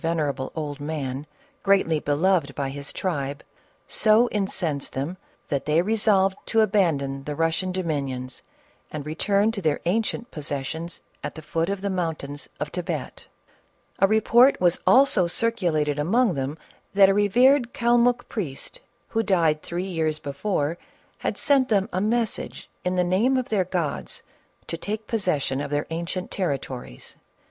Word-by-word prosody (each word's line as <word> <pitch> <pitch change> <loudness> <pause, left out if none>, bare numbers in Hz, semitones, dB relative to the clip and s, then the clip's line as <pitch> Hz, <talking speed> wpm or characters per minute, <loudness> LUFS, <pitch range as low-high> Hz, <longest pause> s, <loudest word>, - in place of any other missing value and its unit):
ven 165 0 0
erable 140 -3 -2
old 150 -2 -4
man, 145 -2 -4 0.3
greatly 190 -6 +3
beloved 150 0 +1
by 140 -1 -2
his 140 +1 -6
tribe, 145 -6 -3 0.4
so 220 +2 +4
in 205 -2 0
censed 155 -8 -2
them 140 +7 -3 0.3
that 140 -2 -2
they 155 +2 +3
resolved 195 -1 +3
to 225 - +3
abandon 155 -10 +1
the 150 - -3
Eus 165 +1 +1
gian 185 -1 -2
dominions 140 -8 -3 0.5
and 150 -2 -6
return 200 +7 +1
to 215 -3 -5
their 155 -4 +1
ancient 225 +5 -1
possessions 150 +3 -4 0.2
at - - -5
the 160 - -8
foot 165 +3 -1
of 200 -1 -2
the 200 - -1
mountains 160 -5 -3
of 150 - -3
Thibet. 170 -6 -5 0.7
A 195 - +6
report 230 +5 +5
was 175 -1 +3
also 255 -9 +6
circulated 170 -9 0
among 215 +7 +2
them 140 +1 -3 0.4
that 195 -1 +8
a - - +4
revered 240 +6 +4
Calmuck 240 +1 +2
priest, 180 - -5 0.3
who 225 - +1
died 165 -8 +2
three 175 +1 -4
years 160 -4 -1
before, 145 +2 -2 0.4
had - - -2
sent 275 -4 +3
them 200 -3 +2
a 185 - 0
message 225 +1 -1 0.2
in 180 0 0
the 180 - +3
name 210 +9 +2
of 255 - -2
their 200 -4 +1
gods 175 -5 -3 0.4
to 165 - -4
take 215 +5 -4
possession 155 - 0
of 145 - -4
their 145 0 -1
ancient 170 +3 -4
territories. 130 - -4
175 Hz, 155 wpm, -25 LUFS, 145-205 Hz, 0.7 s, that